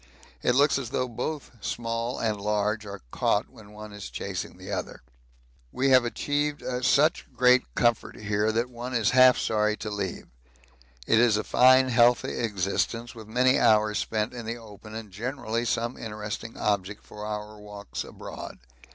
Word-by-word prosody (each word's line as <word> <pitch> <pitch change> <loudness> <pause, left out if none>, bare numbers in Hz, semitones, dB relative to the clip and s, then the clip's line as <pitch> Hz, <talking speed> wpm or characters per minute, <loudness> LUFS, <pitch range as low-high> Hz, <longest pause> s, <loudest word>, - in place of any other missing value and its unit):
It 125 - +2
looks 140 +1 +4
as 125 -4 -5
though 125 - -1
both 130 +5 -5
small 115 +1 -2
and 110 -3 -1
large 105 +1 0
are 100 -5 -8
caught - - 0
when 105 -2 -15
one 105 0 -10
is 105 -2 -7
chasing - - -5
the - - -9
other. - - -5 0.7
We 135 +1 +1
have 130 -2 +6
achieved 145 +4 -1 0.2
such 150 +6 +3
great 125 0 +4
comfort 120 -2 +1
here 105 +1 0
that 115 +3 -1
one 120 +1 -5
is 115 -3 +2
half 130 0 +7
sorry 105 0 +1
to 105 - -5
leave 100 -3 -4 0.8
it 115 - +4
is 115 -3 +4
a 105 - -1
fine 130 +1 +5
healthy 120 0 +3
existence 115 +2 -1
with 110 -2 -11
many 125 +3 +3
hours 110 -2 +4
spent 110 +1 -2
in 120 -2 -7
the 115 +1 -3
open 110 -1 -12
and 110 -3 -7
generally 115 +2 -3
some 120 +2 -1
interesting 105 +1 -6
object 100 0 -1
for 105 - -10
our 105 0 -5
walks 105 -1 -7
abroad. - - -9
115 Hz, 165 wpm, -27 LUFS, 105-125 Hz, 0.8 s, half